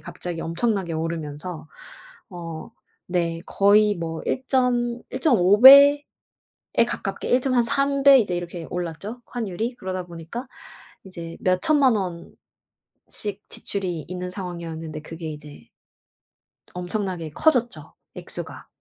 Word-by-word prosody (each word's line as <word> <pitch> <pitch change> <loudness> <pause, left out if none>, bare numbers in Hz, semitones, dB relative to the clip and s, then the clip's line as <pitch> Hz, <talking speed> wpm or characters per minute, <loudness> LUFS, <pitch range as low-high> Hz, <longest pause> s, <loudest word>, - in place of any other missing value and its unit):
갑자기 175 -1 -6
엄청나게 190 0 -1
오르면서 160 0 -5 0.6
어 165 -3 -8 0.4
네 170 -2 -1
거의 205 +1 +4
뭐 165 -2 -5
일점 250 -2 0
일점오 210 - +3
배에 280 +3 +10 0.9
가깝게 - - -4
1 250 0 +3
점 265 - 0
한 240 - +3
3 275 +2 +1
배 275 -1 +8
이제 200 -6 0
이렇게 175 -1 -6
올랐죠 180 +7 -5
환율이. 225 0 -4
그러다 185 -3 -5
보니까 175 +10 -8 0.6
이제 170 -3 -8
몇천만 250 +7 +3 0.9
원씩 205 -1 -6
지출이 180 -5 -4
있는 180 0 -5
상황이었는데 165 -4 -6
그게 165 0 -7
이제 150 -1 -11 1.1
엄청나게 180 -2 -3
커졌죠 235 - 0 0.2
액수가. - - -4
185 Hz, 250 characters per minute, -23 LUFS, 165-240 Hz, 1.1 s, 배에